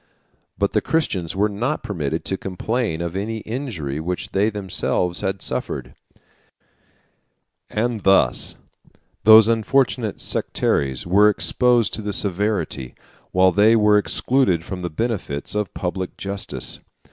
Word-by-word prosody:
But -, -, 0 dB
the -, -, +2 dB
Christians 95 Hz, -, -1 dB
were 100 Hz, +2 st, +2 dB
not 120 Hz, +9 st, -2 dB
permitted 80 Hz, -4 st, -3 dB
to 95 Hz, -, 0 dB
complain 95 Hz, -1 st, -2 dB
of 85 Hz, +1 st, -4 dB
any 110 Hz, +3 st, -3 dB
injury 105 Hz, -, -4 dB
which 90 Hz, +3 st, -4 dB
they 100 Hz, +3 st, +2 dB
themselves 95 Hz, -3 st, -1 dB
had 95 Hz, 0 st, -3 dB
suffered; -, -, -4 dB, 1.8 s
and 115 Hz, 0 st, -1 dB
thus 95 Hz, 0 st, +2 dB, 0.7 s
those 110 Hz, 0 st, +9 dB
unfortunate 115 Hz, 0 st, +1 dB
sectaries 65 Hz, -2 st, -1 dB
were 100 Hz, +4 st, +5 dB
exposed 115 Hz, +6 st, +2 dB
to -, -, -2 dB
the 105 Hz, -1 st, -3 dB
severity, 100 Hz, -, -1 dB, 0.4 s
while 95 Hz, 0 st, +4 dB
they 105 Hz, +5 st, +5 dB
were 105 Hz, -1 st, +5 dB
excluded 105 Hz, -6 st, +1 dB
from 90 Hz, 0 st, -6 dB
the 90 Hz, -, -3 dB
benefits, 90 Hz, -7 st, -3 dB
of 105 Hz, -2 st, -2 dB
public 95 Hz, 0 st, -4 dB
justice. 100 Hz, 0 st, -4 dB
100 Hz, 125 wpm, -21 LUFS, 90-110 Hz, 1.8 s, those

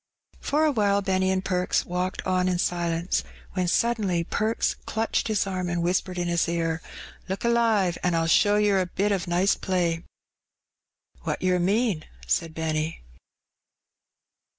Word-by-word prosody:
For 305 Hz, +2 st, +1 dB
awhile 205 Hz, -8 st, +2 dB
Benny 190 Hz, -1 st, +1 dB
and 190 Hz, 0 st, 0 dB
Perks 180 Hz, -1 st, +1 dB
walked 180 Hz, +2 st, -3 dB
on 185 Hz, -1 st, +1 dB
in 180 Hz, -1 st, +1 dB
silence, 170 Hz, 0 st, 0 dB, 0.3 s
when 185 Hz, -2 st, 0 dB
(uddenly 195 Hz, -5 st, +1 dB
Perks 220 Hz, +2 st, 0 dB
clutched 225 Hz, +1 st, 0 dB
his 215 Hz, -3 st, +1 dB
arm 185 Hz, -2 st, -2 dB
and 175 Hz, -1 st, -1 dB
whispered 180 Hz, +1 st, 0 dB
in 175 Hz, 0 st, -1 dB
his 170 Hz, -1 st, +1 dB
ear 165 Hz, -1 st, -1 dB, 0.2 s
— -, -, -17 dB
"Look 190 Hz, +4 st, -3 dB
alive, 225 Hz, -7 st, +2 dB
an* 180 Hz, -, +1 dB
Fll 165 Hz, 0 st, +1 dB
show 205 Hz, +5 st, +4 dB
yer 205 Hz, -2 st, +3 dB
a 180 Hz, -, -2 dB
bit 200 Hz, +3 st, 0 dB
of 190 Hz, -3 st, -1 dB
nice 180 Hz, +3 st, +3 dB
play." 175 Hz, -3 st, -1 dB, 1.2 s
"What -, -, -3 dB
yer 180 Hz, -1 st, +2 dB
mean?" 195 Hz, -2 st, +1 dB, 0.2 s
said 165 Hz, -2 st, -1 dB
Benny. 160 Hz, -, -2 dB
185 Hz, 150 wpm, -26 LUFS, 170-200 Hz, 1.2 s, show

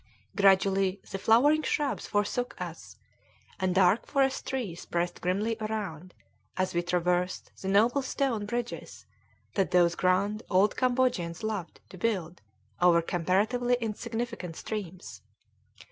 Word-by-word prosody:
Gradually 195 Hz, 0 st, +3 dB
the 195 Hz, -, -3 dB
flowering 275 Hz, +10 st, +4 dB
shrubs 295 Hz, -2 st, -1 dB
forsook 210 Hz, +4 st, -1 dB
us, -, -, -8 dB, 0.6 s
and 185 Hz, -1 st, 0 dB
dark 190 Hz, +4 st, +4 dB
forest 270 Hz, -1 st, +1 dB
trees 230 Hz, -11 st, -3 dB
pressed 175 Hz, 0 st, -2 dB
grimly 205 Hz, +5 st, 0 dB
around, 195 Hz, -6 st, -4 dB, 0.4 s
as 185 Hz, 0 st, 0 dB
we 175 Hz, -, +1 dB
traversed 180 Hz, +1 st, -1 dB
the 190 Hz, -, -5 dB
noble 225 Hz, +8 st, +3 dB
stone 255 Hz, -5 st, -1 dB
bridges 240 Hz, +2 st, -5 dB, 0.5 s
that 195 Hz, -2 st, +1 dB
those 175 Hz, -1 st, +4 dB
grand 195 Hz, +4 st, +1 dB
old 195 Hz, +2 st, +3 dB
Cambodians 245 Hz, -9 st, 0 dB
loved 210 Hz, -6 st, -4 dB
to 185 Hz, -, -12 dB
build 180 Hz, -6 st, -2 dB, 0.4 s
over 175 Hz, -1 st, +6 dB
comparatively 205 Hz, +9 st, +1 dB
insignificant 225 Hz, -4 st, -4 dB
streams. 190 Hz, -3 st, -6 dB
200 Hz, 120 wpm, -29 LUFS, 180-230 Hz, 0.6 s, over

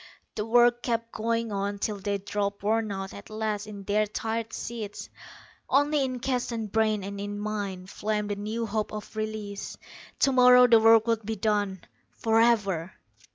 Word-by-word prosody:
The 210 Hz, +1 st, -3 dB
work 240 Hz, +1 st, +4 dB
kept 230 Hz, -1 st, -2 dB
going 230 Hz, 0 st, -1 dB
on 200 Hz, 0 st, -2 dB
till 205 Hz, 0 st, -2 dB
they 200 Hz, +1 st, -1 dB
dropped 200 Hz, 0 st, -3 dB
worn 220 Hz, 0 st, +1 dB
out 195 Hz, -1 st, -5 dB
at 200 Hz, -, -11 dB
last 215 Hz, -1 st, -3 dB
in 205 Hz, -2 st, -8 dB
their 210 Hz, +2 st, +1 dB
tired 225 Hz, +2 st, -3 dB
seats. 215 Hz, -3 st, -6 dB, 0.6 s
Only 290 Hz, +1 st, +3 dB
in 255 Hz, -1 st, -3 dB
Keston's 235 Hz, -4 st, -2 dB
brain, 215 Hz, -2 st, +1 dB
and 200 Hz, +1 st, -5 dB
in 205 Hz, 0 st, -4 dB
mine, 205 Hz, -3 st, -4 dB
flamed 210 Hz, +2 st, -2 dB
the -, -, -1 dB
new 215 Hz, +3 st, -3 dB
hope 215 Hz, 0 st, -2 dB
of 215 Hz, 0 st, -8 dB
release. 215 Hz, -2 st, -5 dB, 0.4 s
Tomorrow 250 Hz, -2 st, +6 dB
the 230 Hz, -2 st, +6 dB
work 225 Hz, 0 st, +6 dB
would 230 Hz, -1 st, 0 dB
be 220 Hz, +2 st, -3 dB
done, 205 Hz, -2 st, 0 dB, 0.4 s
forever. 220 Hz, -6 st, +2 dB
215 Hz, 160 wpm, -27 LUFS, 205-230 Hz, 0.6 s, Tomorrow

